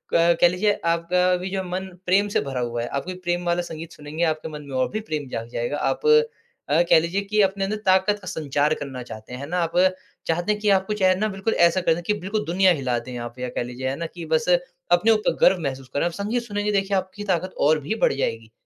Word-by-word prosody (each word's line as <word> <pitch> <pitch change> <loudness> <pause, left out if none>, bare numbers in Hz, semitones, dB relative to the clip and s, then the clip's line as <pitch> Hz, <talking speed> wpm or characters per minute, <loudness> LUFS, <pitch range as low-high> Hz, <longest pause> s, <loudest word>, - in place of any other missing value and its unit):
कह 170 +1 +5
लीजिए, 205 +4 +1
आपका 175 +2 +2
अभी 180 +1 -2
जो 190 -1 -2
मन 185 +1 -4 0.2
प्रेम 195 +3 +3
से - - +1
भरा 135 -2 -4
हुआ 120 -1 -2
है, 120 - -3
आप 140 +2 -3
कोई 185 - -4
प्रेम 175 0 -1
वाला 175 0 +1
संगीत 165 -1 -8
सुनेंगे, 150 +3 -5
आपके 155 -1 -1
मन 150 -1 -7
में 135 - -5
और 130 - +1
भी 215 - -2
प्रेम 150 -3 -3
जाग 115 -1 -4
जाएगा। 120 +5 -2
आप - - -1 0.6
अ, 160 +4 +4
कह - - +7
लीजिए 170 +5 -1
कि 210 +1 +1
अपने 195 0 +1
अंदर 205 +2 -1
ताकत 190 +2 +3
का 180 - -11
संचार 150 -1 0
करना 135 -4 -6
चाहते 110 0 -10
हैं। 125 - -6
है 140 - -5
ना? 180 0 0
आप 165 -1 0 0.6
चाहते 175 +5 +1
हैं 210 - -1
कि 210 - +2
आपको 195 +1 +2
चाहे 190 -3 +3
ना, 215 +3 0
बिल्कुल 195 +2 -2
ऐसा 170 +2 +4
कर 170 - +3
दें 175 - -5
कि 210 - +3
बिल्कुल 210 +3 -2
दुनिया 185 +2 +4
हिला 130 -6 -1
दें 125 +1 -8
आप 120 +1 -7
या 125 0 -3
कह - - 0
लीजिए, 125 +2 -5
है 135 - -2
ना 170 - -4
कि 170 -2 -7
बस 155 0 +1 0.4
अपने 175 +6 +5
ऊपर 215 -1 +2
गर्व 185 0 +5
महसूस 135 -3 -4
करें। 145 - +1
आप 175 - 0
संगीत 210 +7 -2
सुनेंगे 205 -2 -2
देखिए, 195 0 +1
आपकी 190 +2 -4
ताकत 185 -2 -1
और 155 +2 +4
भी 150 +10 -3
बढ़ - - +4
जाएगी। 115 -4 -3
175 Hz, 255 wpm, -23 LUFS, 145-195 Hz, 0.6 s, कह